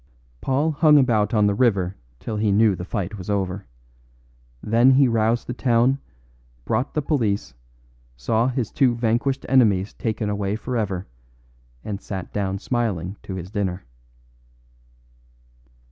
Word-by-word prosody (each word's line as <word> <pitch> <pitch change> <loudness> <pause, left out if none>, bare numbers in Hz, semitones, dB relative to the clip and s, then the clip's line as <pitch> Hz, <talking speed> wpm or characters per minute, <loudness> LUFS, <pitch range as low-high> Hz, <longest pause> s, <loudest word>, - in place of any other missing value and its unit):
Paul 145 +4 +1
hung 150 0 +5
about 110 -7 +3
on 105 -2 +3
the 100 - +3
river 100 -5 +1 0.2
till 110 - -4
he 105 -1 +1
knew 105 +1 +4
the 90 - -6
fight 100 +1 -4
was 90 - -8
over. 95 -2 -2 1.0
Then 115 +4 +4
he 135 0 +5
roused 115 0 +1
the 125 - -4
town, 125 +2 +2 0.7
brought 120 +4 -1
the 150 - 0
police, 110 - -1 0.6
saw 110 - +1
his 125 -4 -2
two 125 -3 +2
vanquished 120 +4 0
enemies 105 -7 +3
taken 110 -2 -3
away 100 0 -1
forever, 110 -6 -3 0.8
and 105 -1 -5
sat 95 -3 -6
down 95 -2 -1
smiling 105 -5 -2
to 95 - -7
his 90 0 -7
dinner." 95 -3 -2
110 Hz, 135 wpm, -23 LUFS, 100-125 Hz, 1.0 s, hung